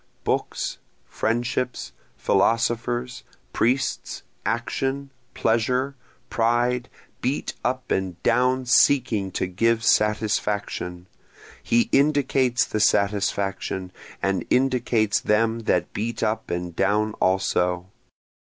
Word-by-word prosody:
Books, -, -, -2 dB, 0.3 s
friendships, 120 Hz, +2 st, -2 dB, 0.3 s
philosophers, 120 Hz, +4 st, 0 dB, 0.3 s
priests, 130 Hz, +4 st, 0 dB, 0.2 s
action, 135 Hz, +1 st, -2 dB, 0.2 s
pleasure, 125 Hz, +4 st, +1 dB, 0.3 s
pride, 120 Hz, +2 st, +1 dB, 0.3 s
beat 130 Hz, +4 st, -1 dB
up 130 Hz, +1 st, -2 dB
and 95 Hz, -2 st, -1 dB
down 125 Hz, +2 st, +2 dB
seeking 125 Hz, -6 st, +3 dB
to -, -, -1 dB
give 115 Hz, +5 st, +1 dB
satisfaction, 105 Hz, -5 st, 0 dB, 0.6 s
He 120 Hz, 0 st, +2 dB
indicates 135 Hz, -3 st, +3 dB
the 110 Hz, -, -3 dB
satisfaction, 100 Hz, -2 st, 0 dB, 0.3 s
and 95 Hz, 0 st, +1 dB
indicates 125 Hz, -5 st, +2 dB
them 115 Hz, +2 st, +1 dB
that 90 Hz, -1 st, +1 dB
beat 110 Hz, +1 st, -3 dB
up 110 Hz, +1 st, -1 dB
and 85 Hz, -1 st, -4 dB
down 105 Hz, +3 st, +1 dB
also. 90 Hz, -1 st, +1 dB
115 Hz, 90 wpm, -24 LUFS, 100-125 Hz, 0.6 s, seeking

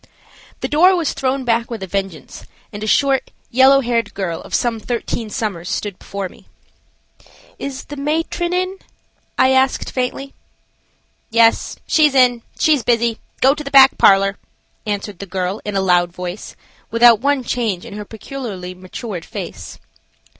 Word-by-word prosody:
The -, -, -1 dB
door 340 Hz, +7 st, +5 dB
was 335 Hz, -4 st, -1 dB
thrown 265 Hz, 0 st, -1 dB
back 230 Hz, 0 st, +1 dB
with 225 Hz, -5 st, -5 dB
a -, -, -2 dB
vengeance, 190 Hz, -5 st, -5 dB, 0.3 s
and 205 Hz, +1 st, -6 dB
a -, -, -3 dB
short, 275 Hz, +3 st, +2 dB, 0.2 s
yellow 265 Hz, +2 st, +6 dB
haired 235 Hz, -4 st, -1 dB
girl 175 Hz, -4 st, -3 dB
of -, -, -4 dB
some 235 Hz, -2 st, 0 dB
thirteen 230 Hz, -1 st, -3 dB
summers 195 Hz, -5 st, -4 dB
stood 205 Hz, -3 st, -3 dB
before 200 Hz, -1 st, -5 dB
me. -, -, -19 dB, 1.1 s
"Is 275 Hz, 0 st, -5 dB
the 290 Hz, -, -9 dB
matron 325 Hz, +4 st, -1 dB
in?" 370 Hz, +1 st, -1 dB, 0.6 s
I 260 Hz, -, +4 dB
asked, 265 Hz, 0 st, +1 dB
faintly. 265 Hz, +2 st, -3 dB, 1.0 s
"Yes, 230 Hz, 0 st, +3 dB
she's 300 Hz, -3 st, +3 dB
in; 250 Hz, -2 st, +4 dB, 0.2 s
she's 300 Hz, -4 st, +3 dB
busy. 235 Hz, -1 st, +1 dB, 0.2 s
Go 265 Hz, +1 st, +6 dB
to 300 Hz, +1 st, -7 dB
the 275 Hz, -, -6 dB
back 270 Hz, -1 st, +7 dB
parlor," 195 Hz, 0 st, +4 dB, 0.5 s
answered 205 Hz, -2 st, -4 dB
the 200 Hz, -, -7 dB
girl, 185 Hz, +2 st, -3 dB
in 210 Hz, -1 st, -4 dB
a 195 Hz, -, +2 dB
loud 175 Hz, -2 st, +2 dB
voice, 180 Hz, +2 st, -7 dB, 0.3 s
without 230 Hz, -1 st, +6 dB
one 280 Hz, -1 st, +1 dB
change 225 Hz, -6 st, -2 dB
in 235 Hz, -, -9 dB
her 210 Hz, 0 st, -6 dB
peculiarly 215 Hz, -5 st, -7 dB
matured 185 Hz, +1 st, -7 dB
face. -, -, -8 dB
230 Hz, 155 wpm, -19 LUFS, 195-270 Hz, 1.1 s, back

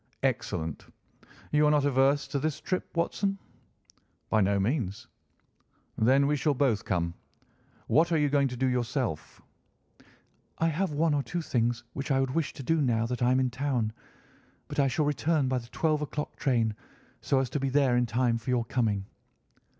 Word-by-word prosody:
"Excellent. 80 Hz, -1 st, -2 dB, 0.6 s
You 150 Hz, 0 st, +4 dB
are -, -, +5 dB
not 150 Hz, -2 st, +3 dB
averse 140 Hz, +1 st, +3 dB
to 140 Hz, -, -1 dB
this 155 Hz, +1 st, -2 dB
trip, 185 Hz, -, -2 dB
Watson?" 195 Hz, +4 st, 0 dB, 0.9 s
"By 110 Hz, -, +4 dB
no 100 Hz, +1 st, +2 dB
means." 105 Hz, -2 st, -1 dB, 0.9 s
"Then 130 Hz, +5 st, +4 dB
we 150 Hz, +1 st, +2 dB
shall 145 Hz, 0 st, +1 dB
both 125 Hz, -6 st, +1 dB
come. 85 Hz, -2 st, -1 dB, 0.7 s
What 165 Hz, +3 st, +3 dB
are 165 Hz, -, +3 dB
you 150 Hz, -1 st, +3 dB
going 140 Hz, -1 st, +2 dB
to 125 Hz, -1 st, -6 dB
do 130 Hz, -, +1 dB
yourself?" 125 Hz, -, -2 dB, 1.1 s
"I 165 Hz, -, +2 dB
have 170 Hz, +3 st, -1 dB
one 155 Hz, +1 st, +2 dB
or 145 Hz, -, +2 dB
two 175 Hz, +4 st, -4 dB
things 120 Hz, -3 st, 0 dB
which 140 Hz, +1 st, -5 dB
I 135 Hz, -1 st, +3 dB
would 135 Hz, -1 st, 0 dB
wish 165 Hz, -2 st, 0 dB
to 135 Hz, -, -8 dB
do 160 Hz, +5 st, +1 dB
now 115 Hz, -4 st, +1 dB
that 125 Hz, +1 st, -4 dB
I 120 Hz, -, +3 dB
am 130 Hz, -, +3 dB
in 130 Hz, -1 st, +1 dB
town. 125 Hz, -4 st, -1 dB, 0.7 s
But -, -, -4 dB
I 140 Hz, -, +4 dB
shall 150 Hz, +3 st, 0 dB
return 150 Hz, 0 st, +1 dB
by 130 Hz, -1 st, 0 dB
the 120 Hz, -, -12 dB
twelve 155 Hz, +1 st, 0 dB
o'clock 150 Hz, 0 st, -4 dB
train, 115 Hz, -5 st, +1 dB, 0.5 s
so 135 Hz, -, +1 dB
as 130 Hz, -3 st, -2 dB
to 145 Hz, -, -1 dB
be 135 Hz, 0 st, -1 dB
there 135 Hz, -2 st, +3 dB
in 120 Hz, 0 st, +2 dB
time 120 Hz, 0 st, +1 dB
for 130 Hz, -, -8 dB
your 120 Hz, -2 st, +1 dB
coming." 110 Hz, -5 st, 0 dB
135 Hz, 185 wpm, -28 LUFS, 120-150 Hz, 1.1 s, are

